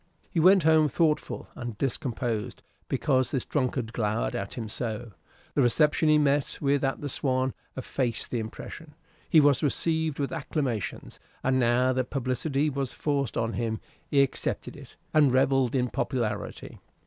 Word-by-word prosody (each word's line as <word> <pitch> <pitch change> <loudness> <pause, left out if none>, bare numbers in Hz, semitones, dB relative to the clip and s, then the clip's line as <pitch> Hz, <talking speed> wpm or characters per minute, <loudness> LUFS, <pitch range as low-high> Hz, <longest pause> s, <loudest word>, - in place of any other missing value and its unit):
He 170 - 0
went 185 +2 +6
home 160 -1 +5
thoughtful 150 0 0
and 120 -4 -6
discomposed, 120 -4 -2 0.3
because 130 -3 +1
this 135 -4 -1
drunkard 130 -4 -1
glowered 105 - -1
at - - -4
him 115 -2 -4
so. 115 0 -4 0.4
The 145 - +2
reception 150 +5 +3
he 155 - +6
met 145 -1 +1
with 140 -1 +1
at 135 0 -1
the 145 - -3
"Swan" 130 -1 0 0.2
effaced 125 -2 -2
the 120 - 0
impression. 150 +7 -8 0.3
He 160 - +7
was 145 -3 +4
received 160 +1 0
with 140 -1 -2
acclamations, 125 - -3 0.2
and 130 0 +2
now 125 +1 +3
that 130 0 -1
publicity 135 +3 -1
was 140 -3 -2
forced 140 -6 -1
on 115 0 0
him, 115 -2 -2 0.3
he 140 -1 +4
accepted 135 - -3
it, - - -13 0.2
and 150 -4 +5
revelled 130 0 +2
in 125 -1 +2
popularity. 110 -1 -3
130 Hz, 155 wpm, -27 LUFS, 120-145 Hz, 0.4 s, He